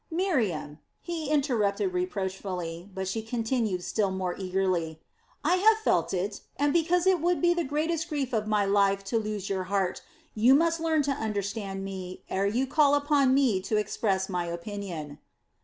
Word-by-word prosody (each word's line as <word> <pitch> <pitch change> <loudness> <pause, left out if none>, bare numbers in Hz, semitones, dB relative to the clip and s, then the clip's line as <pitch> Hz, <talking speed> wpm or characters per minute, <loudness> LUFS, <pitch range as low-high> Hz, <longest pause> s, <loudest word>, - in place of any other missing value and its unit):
"Miriam," 235 - -1 0.2
he 330 -4 -4
interrupted 270 - +1
reproachfully, 190 - -3
but 190 0 -4
she 220 +4 -2
continued 225 -4 -1
still 205 0 0
more 185 -1 -2
eagerly: 185 -4 -1 0.4
"I 345 +5 +3
have 435 +4 +5
felt 440 - +1
it, 195 +2 -2 0.2
and 285 +1 +2
because 340 +1 +2
it 375 -4 +3
would 350 +1 +2
be 345 0 +4
the 345 -1 -1
greatest 320 +3 -1
grief 280 -5 -2
of 215 -2 0
my 210 -1 +2
life 195 0 +2
to 210 +4 0
lose 210 -2 -4
your 190 -2 -2
heart, 195 -1 -1 0.3
you 235 +5 +5
must 330 +2 +2
learn 320 -2 +2
to 285 - 0
understand 200 -4 -3
me, 185 -2 -7
ere 195 +1 +1
you 240 +6 +1
call 290 +1 +4
upon 285 -2 +3
me 245 -9 +3
to 215 +3 -1
express 200 -2 0
my 180 -2 -2
opinion." 170 -4 -6
215 Hz, 170 wpm, -28 LUFS, 190-295 Hz, 0.4 s, have